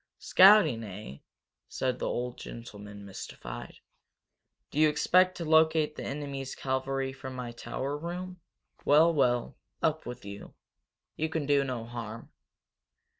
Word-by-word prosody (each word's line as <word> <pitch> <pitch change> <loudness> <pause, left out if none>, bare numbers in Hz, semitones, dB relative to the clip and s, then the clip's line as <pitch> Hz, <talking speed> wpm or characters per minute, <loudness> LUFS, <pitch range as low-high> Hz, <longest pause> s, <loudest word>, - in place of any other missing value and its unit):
"Scouting, 185 - +6
eh?" 100 -8 -8 0.5
said 130 -1 -1
the - - -1
old 125 0 -2
gentleman, 105 -3 -9
mystified. 80 -10 -8 1.0
"Do 150 - -2
you 155 0 +6
expect 180 +5 +3
to 170 - -4
locate 160 -1 +4
the - - -6
enemy's 140 -2 -5
cavalry 135 0 -2
from 130 -1 -8
my 125 -2 -5
tower 130 +4 -4
room? 175 +3 -6 0.4
Well, 160 +4 +5
well 125 -5 +1 0.3
up 155 -2 +1
with 120 -4 -7
you. 100 0 -9 0.6
You 160 +1 0
can 160 -2 -2
do 140 -1 +3
no 125 -4 -4
harm." 115 -1 -7
135 Hz, 130 wpm, -29 LUFS, 120-155 Hz, 1.0 s, Scouting